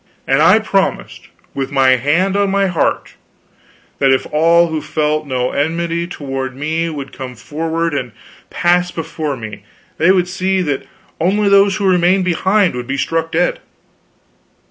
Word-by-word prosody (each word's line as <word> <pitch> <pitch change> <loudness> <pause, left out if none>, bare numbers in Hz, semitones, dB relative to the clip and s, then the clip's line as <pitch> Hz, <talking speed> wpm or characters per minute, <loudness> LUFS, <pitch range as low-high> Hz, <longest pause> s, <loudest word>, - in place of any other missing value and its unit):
And - - +2
I - - +6
promised, - - -2 0.3
with 135 0 -4
my 135 -2 +3
hand 150 +10 +2
on 200 -1 +1
my 195 0 +1
heart, 180 -4 -1 0.9
that 135 - +3
if 130 0 +2
all 170 +2 +4
who 160 -1 -3
felt 150 0 -1
no 125 -1 -1
enmity 170 +3 -1
toward 135 -5 -5
me 160 +4 -2
would 140 -4 -7
come 130 -1 -7
forward 160 +6 -3
and 125 -4 -3 0.4
pass 180 0 +1
before 160 -4 -4
me 105 -3 -9 0.4
they 165 - +3
should 185 -2 +3
see 185 +1 -1
that 145 -5 -3 0.3
only 200 +5 +2
those 200 0 +4
who 200 - -2
remained 180 +1 +3
behind 190 +2 +2
would 125 -1 -6
be 135 +1 -2
struck 165 +3 -1
dead. 175 +2 0
165 Hz, 155 wpm, -16 LUFS, 140-180 Hz, 0.9 s, I